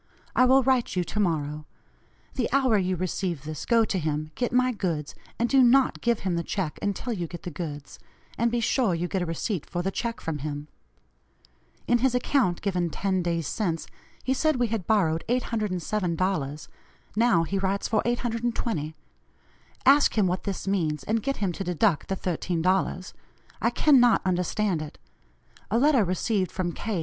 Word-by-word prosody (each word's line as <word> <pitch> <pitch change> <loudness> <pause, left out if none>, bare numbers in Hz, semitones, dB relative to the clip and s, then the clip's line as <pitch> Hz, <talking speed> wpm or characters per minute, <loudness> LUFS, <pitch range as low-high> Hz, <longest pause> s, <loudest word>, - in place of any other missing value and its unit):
I 255 - +6
will 265 +1 +5
write 255 -4 +1
you 180 - +1
to 210 - -4
morrow. 150 -5 -1 0.7
The 250 -3 -1
hour 260 -3 +3
you 185 0 0
receive 175 -3 -2
this 155 0 -6
go 230 -2 +4
to 195 - -1
him, 155 -1 -2
get 245 - -2
my 255 +1 +3
goods, 170 -9 -3 0.2
and 235 - +1
do 270 +1 +5
not 255 +2 +4
give 235 -2 +1
him 185 -2 -1
the 170 - 0
check 175 -3 -3
until 205 +4 -2
you 175 -5 -3
get 175 +1 -9
the 175 - -5
goods, 145 -3 -7 0.4
and 235 +1 +1
be 240 +1 0
sure 230 -5 +2
you 170 +2 -2
get 190 0 -2
a 175 - -2
receipt 165 +1 -3
for 175 0 -2
the 195 - -1
check 230 +3 -3
from 160 -2 -4
him. 145 +1 -5 1.2
In 240 - +3
his 255 0 +2
account 250 -8 +1
given 180 -3 0
ten 190 +2 -1
days 170 -2 -1
since, 170 -1 -2 0.4
he 260 - +1
said 310 +3 +2
we 245 -2 0
had 205 -6 -3
borrowed 165 -7 +2
$807; 185 - -1 0.5
now 225 -6 +4
he 195 +4 -2
writes 195 +1 0
for 215 -2 +2
$820. 230 -9 -2 0.9
Ask 280 -2 +5
him 210 - +4
what 180 0 -1
this 195 -1 -4
means, 160 -7 0
and 220 +6 0
get 275 +5 -2
him 195 -3 0
to 185 - -5
deduct 180 -2 +1
the 195 - -1
$13. 185 +1 -1 0.5
I - - +3
cannot 250 -6 +4
understand 180 0 0
it. 155 - -8 0.7
A 220 - +2
letter 270 -2 +4
received 185 +1 0
from 180 -2 -2
K. 205 +1 -3
190 Hz, 180 wpm, -26 LUFS, 170-235 Hz, 1.2 s, I